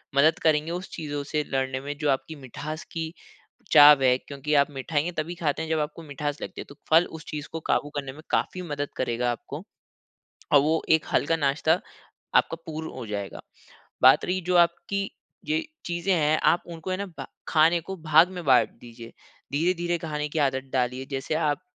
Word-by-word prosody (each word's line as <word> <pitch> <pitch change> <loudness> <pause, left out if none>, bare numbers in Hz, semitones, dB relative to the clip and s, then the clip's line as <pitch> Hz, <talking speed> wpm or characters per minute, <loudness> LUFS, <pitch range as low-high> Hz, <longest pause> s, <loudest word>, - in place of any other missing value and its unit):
मदद 155 +4 +4
करेंगे 155 +1 +2
उस 180 +2 -5
चीज़ों 145 -3 -4
से 150 +1 -1
लड़ने 130 -1 -1
में, 145 +1 -5
जो 150 -1 0
आपकी 140 +4 -1
मिठास 150 +4 -7
की 165 -1 -4 0.6
चाव 145 -2 +9
है। 125 -1 +5
क्योंकि 140 +2 -5
आप 140 - -1
मिठाइयाँ 145 +5 -2
तभी 165 +3 -2
खाते 160 -2 -1
हैं, 160 - -4
जब 160 -1 +1
आपको 150 +2 -4
मिठास 145 0 -4
लगती - - -6
है, - - -8
तो 140 - -12
फल 165 +2 +6
उस 155 - -14
चीज़ 150 0 -5
को 165 - -4
काबू 145 - +1
करने 135 -2 -3
में 155 - -12
काफ़ी 185 - 0
मदद 145 -4 -4
करेगा 120 -1 0
आपको। 120 - -7 0.9
अ, - - +7
वो 155 +3 +3
एक 160 -1 +4
हल्का 165 +3 +2
नाश्ता 150 +3 +2 0.6
आपका - - +3
पूर्ण 160 0 -5
हो 130 -3 -7
जाएगा। 100 -2 -5 0.6
बात - - +7
रही 185 +1 0
जो 180 - +3
आपकी 175 +3 +1 0.4
ये 155 +1 0 0.2
चीज़ें 175 +2 0
हैं, 155 -2 +2
आप 175 - +3
उनको 170 +1 -7
है 185 - 0
ना 200 +1 -4
ब - - -5 0.2
खाने 165 +2 +4
को 190 +4 -7
भाग 160 +2 +4
में 180 -2 -7
बाँट 130 -3 +4
दीजिए। 115 -1 -11 0.4
धीरे-धीरे 175 +3 0
खाने 150 -2 -3
की 155 - -3
आदत 135 -2 +1
डालिए, 130 0 -1
जैसे 135 +2 -3
आप 155 +1 0
150 Hz, 195 wpm, -26 LUFS, 140-165 Hz, 0.9 s, चाव